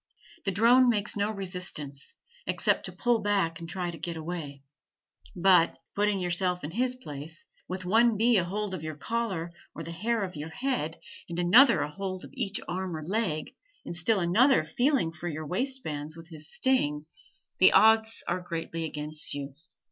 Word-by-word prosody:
The 195 - +1
drone 240 +6 +5
makes 210 -3 0
no 205 0 0
resistance, 180 -8 -4 0.3
except - - +1
to - - -2
pull 240 -2 +1
back 195 -5 0
and 165 0 -8
try 180 0 -3
to 165 - -10
get 170 +1 -4
away; 155 -4 -6 0.7
but 180 -2 +4 0.2
(putting 205 -1 +1
yourself 180 0 +1
in 150 - -4
his 250 +6 0
place) 155 - -9 0.2
with 185 0 -5
one 225 +3 +4
bee 230 +1 +4
a 185 - +3
hold 200 +3 -3
of 185 - -4
your 155 -1 -5
collar 190 -2 -3 0.2
or 165 - -6
the 165 - -7
hair 220 +6 -1
of 185 -2 -5
your 150 +2 -6
head, 170 - -2 0.3
and 170 - -5
another 230 +9 +6
a 150 - -3
hold 185 +1 -5
of - - -13
each 225 -7 -1
arm 185 -2 -3
or 155 - -7
leg, 185 -5 -1 0.3
and - - -6
still 195 +4 +2
another 225 +11 +4
feeling 260 - +1
for 165 +1 -7
your 155 -1 -4
waistbands 165 - -3
with 165 +1 -12
his 155 -2 -5
sting, 150 - +1 0.5
the 185 - +8
odds 220 0 +5
are 185 - -1
greatly 165 -1 -4
against 150 -1 -5
you. 140 -1 -5
180 Hz, 180 wpm, -28 LUFS, 160-220 Hz, 0.7 s, the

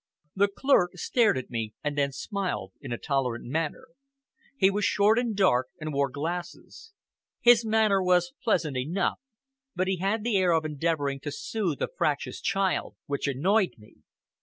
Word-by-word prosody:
The 200 +1 +4
clerk 200 -4 +2
stared 220 - +2
at 130 - -6
me, 110 -3 -4
and 150 -1 -2
then 140 -1 +1
smiled 180 - -4
in 135 - -7
a 120 - -2
tolerant 130 -4 -2
manner. 160 - -3 0.7
He 190 -6 +4
was 205 +1 -1
short 210 +4 +3
and 235 -3 -1
dark, 130 -11 +3
and 155 -1 -4
wore 140 0 +1
glasses. 175 - -6 0.5
His 240 -1 +6
manner 220 -3 +3
was 180 -1 +2
pleasant 150 -5 +1
enough, 170 +9 -1 0.6
but 185 +1 0
he 190 -1 0
had 200 +4 -1
the 230 -3 +1
air 180 -2 +3
of 160 -1 +1
endeavoring 150 -2 -1
to 145 +2 -5
soothe 190 -2 -2
a - - +1
fractious - - -2
child 195 - 0
which 140 -1 -2
annoyed 185 +9 +1
me. 105 0 -19
175 Hz, 165 wpm, -27 LUFS, 140-200 Hz, 0.7 s, His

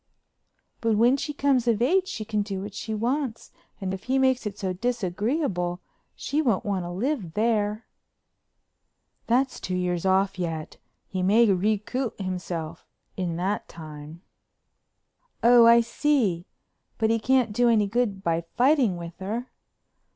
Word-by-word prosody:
"But 225 -2 +2
when 240 +4 +5
she 290 +2 -3
comes 275 -4 +1
of 225 -3 +3
age 365 +10 +2
she 220 - -5
can 210 -1 -1
do 195 -2 -4
what 205 0 -7
she 220 - -6
wants 245 +2 -2 0.3
and 190 -2 -3
if 190 - -7
he 260 +2 +1
makes 260 -3 +2
it 200 -1 -6
so 190 -2 -2
disagreeable 205 - -1 0.4
she 300 +2 -1
won't 235 -10 +1
want 195 -3 -1
to - - -5
live 195 - -2
there." 215 -1 0 1.4
"That's 255 +3 +1
two 185 - -3
years 180 -1 -1
off 190 0 +2
yet. 165 -3 -4 0.3
He 185 - -3
may 210 +6 +5
recoup 215 +6 -1
himself 175 -4 -5 0.3
in 175 -3 -2
that 190 +4 -2
time." 155 +1 -10 1.2
"Oh, 235 0 +7
I 235 0 +7
see. 230 - 0 0.5
But 220 -1 +2
he 230 - +2
can't 250 -2 +2
do 240 +2 +3
any 215 -3 +4
good 205 -2 -1
by 170 -1 0
fighting 250 - +3
with 170 0 -8
her." 225 +6 -4
210 Hz, 150 wpm, -25 LUFS, 185-245 Hz, 1.4 s, Oh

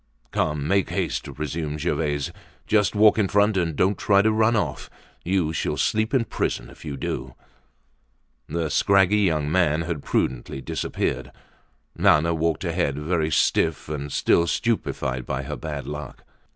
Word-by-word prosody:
"Come, 75 -1 -1
make 100 +1 +2
haste!" - - -2
resumed 75 0 -4
Gervaise. 75 -3 -1 0.3
"Just 105 0 +2
walk 105 +1 +5
in 100 - +3
front, 105 +2 +3
and 85 -4 0
don't 95 +5 +1
try 100 -1 +4
to 110 - +3
run 110 +1 +3
off. 105 - -2 0.3
You 90 -3 0
shall - - -2
sleep 110 +1 +1
in 130 -4 +2
prison - - -3
if - - -15
you 75 -3 -5
do." - - -4 1.1
The 80 0 -2
scraggy 100 +1 +4
young 80 -7 +1
man 80 -3 +2
had 80 -3 -4
prudently 65 0 -1
disappeared. - - -3 0.6
Nana 85 +3 +4
walked 80 -2 0
ahead, 70 0 -1
very 80 +1 0
stiff 80 0 +1
and 75 -1 -4
still 85 +5 +3
stupefied 65 - -1
by - - -2
her - - -5
bad 75 -3 -5
luck. 75 0 -7
80 Hz, 150 wpm, -24 LUFS, 75-100 Hz, 1.1 s, walk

